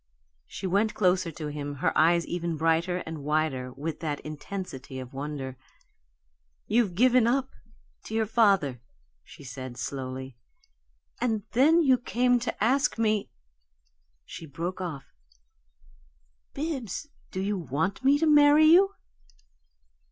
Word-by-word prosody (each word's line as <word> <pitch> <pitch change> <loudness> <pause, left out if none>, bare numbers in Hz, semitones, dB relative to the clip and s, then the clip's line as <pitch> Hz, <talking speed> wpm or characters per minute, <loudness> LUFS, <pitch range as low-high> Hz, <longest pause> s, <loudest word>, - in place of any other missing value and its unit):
She - - -7
went 205 +4 +1
closer 180 -3 +2
to 150 0 -5
him, 145 -1 -5
her 135 - -1
eyes 170 +1 +4
ever 175 0 -3
brighter 165 +3 +1
and 160 -3 -7
wider 145 -4 -1
with 150 +4 -5
that 150 -3 -3
intensity 150 -4 -7
of 130 0 -8
wonder. 135 -2 -5 1.1
"You've 215 -5 +1
given 245 +2 +4
up 265 +2 0 0.5
to 220 - -5
your 225 0 +2
father," 195 - +2 0.4
she - - -14
said, 130 -1 -8
slowly, 130 0 -5 0.8
"and 225 -4 0
then 310 +8 +5
you 260 -4 +4
came 245 0 +2
to 230 -3 -3
ask 270 +5 +2
me 215 -2 +1 0.5
" - - -46
She 165 - -9
broke 170 +6 -5
off. 155 -7 -5 1.5
"Bibbs, 290 - -4 0.2
do 185 - -5
you 200 +1 -1
want 170 - -2
me 275 +2 +5
to 325 - +1
marry 295 0 +6
you?" 380 +5 +6
180 Hz, 130 wpm, -27 LUFS, 145-235 Hz, 1.5 s, marry